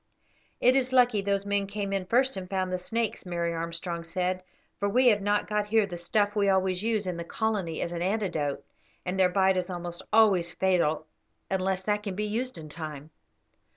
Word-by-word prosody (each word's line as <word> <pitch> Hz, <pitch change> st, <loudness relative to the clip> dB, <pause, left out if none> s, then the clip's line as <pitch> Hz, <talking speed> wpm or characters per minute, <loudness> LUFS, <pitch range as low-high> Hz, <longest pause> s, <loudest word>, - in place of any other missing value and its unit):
"It 250 Hz, +2 st, +5 dB
is 260 Hz, -1 st, +1 dB
lucky 245 Hz, -5 st, +4 dB
those 200 Hz, 0 st, 0 dB
men 200 Hz, -1 st, 0 dB
came 200 Hz, -1 st, -3 dB
in 190 Hz, -2 st, -2 dB
first 260 Hz, +4 st, +2 dB
and 185 Hz, -1 st, -6 dB
found 185 Hz, -1 st, -1 dB
the 185 Hz, -, -1 dB
snakes," 225 Hz, +4 st, -2 dB
Mary 170 Hz, -2 st, -2 dB
Armstrong 170 Hz, +1 st, -4 dB
said, 180 Hz, +2 st, -1 dB, 0.4 s
"for 200 Hz, -, +1 dB
we 250 Hz, +4 st, +5 dB
have 210 Hz, -3 st, +3 dB
not 205 Hz, +1 st, +1 dB
got 210 Hz, 0 st, 0 dB
here 220 Hz, 0 st, +3 dB
the 185 Hz, -3 st, -7 dB
stuff 205 Hz, +4 st, 0 dB
we 200 Hz, -1 st, +3 dB
always 190 Hz, -1 st, +2 dB
use 220 Hz, -2 st, 0 dB
in 180 Hz, -2 st, -3 dB
the 170 Hz, -, -4 dB
colony 195 Hz, -4 st, -2 dB
as 170 Hz, -, -2 dB
an 170 Hz, -1 st, -4 dB
antidote, 180 Hz, -7 st, -1 dB, 0.4 s
and 185 Hz, +1 st, -2 dB
their 185 Hz, -1 st, +5 dB
bite 190 Hz, 0 st, +3 dB
is 180 Hz, 0 st, -1 dB
almost 175 Hz, -1 st, -5 dB
always 200 Hz, -6 st, +4 dB
fatal 170 Hz, -5 st, +1 dB, 0.5 s
unless 190 Hz, 0 st, 0 dB
that 210 Hz, +1 st, 0 dB
can 200 Hz, -3 st, -4 dB
be 210 Hz, +2 st, -1 dB
used 240 Hz, +5 st, -3 dB
in 155 Hz, -1 st, -8 dB
time." 155 Hz, -1 st, -7 dB
190 Hz, 200 wpm, -28 LUFS, 175-210 Hz, 0.5 s, It